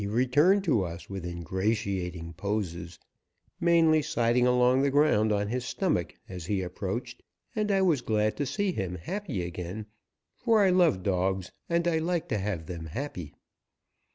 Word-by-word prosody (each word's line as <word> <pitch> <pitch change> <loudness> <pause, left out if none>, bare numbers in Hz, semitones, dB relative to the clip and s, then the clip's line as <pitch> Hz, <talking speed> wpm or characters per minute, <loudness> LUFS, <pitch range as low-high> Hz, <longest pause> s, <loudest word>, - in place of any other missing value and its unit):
He 100 - -2
returned 145 - +3
to 130 - +2
us 85 +2 -7
with 95 -3 -5
ingratiating 90 -1 -2
poses, 90 -2 -3 0.6
mainly 165 -2 +4
sliding 125 -4 +2
along 125 +1 +4
the 140 - +3
ground 135 -7 +3
on 105 0 0
his 125 +2 -2
stomach 125 - -1
as 90 -3 -7
he 95 -2 0
approached, 90 0 -5 0.3
and 215 -1 0
I 195 -1 +3
was 160 -8 +3
glad 110 -1 +1
to 145 - -1
see 205 +3 0
him 95 - -3
happy 105 - -4
again, 90 +4 -5 0.5
for 225 -4 +3
I 190 - +4
love 170 - +3
dogs 95 -1 0 0.2
and 170 0 +1
I 165 -2 +2
like 170 0 -1
to 110 - 0
have 95 -5 -3
them 85 -1 -6
happy. 90 - -6
110 Hz, 160 wpm, -28 LUFS, -, 0.6 s, mainly